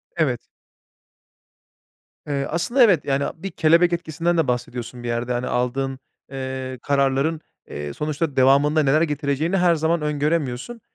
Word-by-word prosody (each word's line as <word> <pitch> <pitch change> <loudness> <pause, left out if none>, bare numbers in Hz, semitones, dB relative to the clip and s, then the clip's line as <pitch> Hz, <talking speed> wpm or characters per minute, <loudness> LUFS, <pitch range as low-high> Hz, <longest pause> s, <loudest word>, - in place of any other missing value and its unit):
Evet. 140 -8 +1 1.9
Eee, 140 -1 -1
aslında, 235 - +2
evet, 185 -10 +4
yani, 140 0 0
bir 190 +4 -7
kelebek 170 +2 +3
etkisinden 170 +1 -1
de 160 -4 +2
bahsediyorsun 120 0 -4
bir - - -4
yerde, 120 +1 -1
hani, 120 +1 -2
aldığın, 130 +2 -1 0.3
eee, 130 -1 -5
kararların, 140 +3 +1 0.3
eee, 75 0 -5
sonuçta 150 - -2
devamında 140 +4 +4
neler 145 +3 +3
getireceğini 150 +3 0
her 175 -2 +4
zaman 160 +1 0
öngöremiyorsun. 150 - -2
145 Hz, 130 wpm, -22 LUFS, 130-165 Hz, 1.9 s, evet